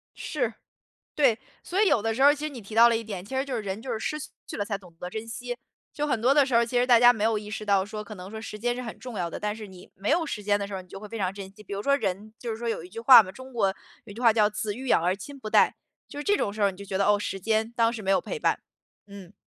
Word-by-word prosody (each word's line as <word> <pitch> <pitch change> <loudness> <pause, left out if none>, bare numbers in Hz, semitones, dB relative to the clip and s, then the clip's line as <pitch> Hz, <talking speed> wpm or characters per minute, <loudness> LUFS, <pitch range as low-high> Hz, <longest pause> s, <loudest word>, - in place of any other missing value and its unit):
是， - - -2 0.6
对， 260 -7 +3 0.2
所 380 +4 0
以 420 - +5
有 225 - +3
的 225 +1 0
时 245 - -3
候 280 - +8
儿 290 - +4
其 295 - -5
实 305 - -2
你 250 -5 -9
提 210 +2 -10
到 235 +1 +8
了 230 - +2
一 230 - -5
点， 200 -5 -6
其 260 +6 -7
实 265 - +1
就 270 -3 -4
是 225 - -2
人 200 +2 -4
就 255 - -5
是 220 - -2
失 305 - -2 0.3
去 - - -6
了 205 - 0
才 200 -1 -2
懂 180 -4 -17
得 180 - -5
珍 220 +4 -6
惜。 245 +1 -5 0.3
就 295 -1 -2
很 250 -6 0
多 255 +4 +4
的 285 -1 +5
时 260 - -4
候 235 - +6
儿 - - +2
其 245 +1 -2
实 245 - +4
大 240 -2 +6
家 245 0 +8
没 220 -3 -3
有 220 -1 +2
意 210 0 -7
识 215 0 -5
到 200 -2 +3
说， 210 0 -6
可 210 +1 -9
能 185 0 -9
说 220 - -7
时 220 -1 -7
间 240 +2 0
是 250 - -4
很 230 -3 -7
重 245 -5 -7
要 170 -2 -1
的， - - -6
但 210 0 -2
是 215 -2 -8
你 185 -1 -14
没 195 +2 -3
有 330 0 +2
时 210 -8 -5
间 205 0 +2
的 200 - -3
时 200 - -8
候 190 - -4
你 180 - -19
就 195 - -9
会 210 - -9
非 225 +2 -6
常 190 -2 -1
珍 195 -1 -8
惜。 210 +2 -16
比 200 - -7
如 200 - -3
说 280 +3 +3
人 205 0 -3
就 235 - -5
是 220 - -4
说 235 0 -3
有 225 - -3
一 180 - -11
句 225 - -7
话 235 -1 +9
嘛， 185 - -8
中 260 +5 -12
国 225 -5 +2 0.4
有 205 - -11
一 - - -9
句 230 - -8
话 230 -2 +6
叫： 215 -1 +3
“子 210 -1 -3
欲 260 +2 -7
养 165 - +3
而 180 +2 +2
亲 275 +9 -10
不 215 -4 -6
待。” - - +4 0.3
就 290 - -8
是 295 - -4
这 410 +4 +3
种 200 - -1
时 215 - -5
候 200 - +5
儿 - - -1
你 185 - -15
就 200 - -9
觉 190 -1 -2
得， 200 - +2
哦， 205 0 +4
时 195 -1 -4
间 220 +3 0
当 230 -1 +3
时 230 - -6
没 195 -1 0
有 - - +3
陪 - - -5
伴， - - +1 0.5
嗯。 200 -2 -11
220 Hz, 380 characters per minute, -26 LUFS, 200-245 Hz, 0.6 s, 话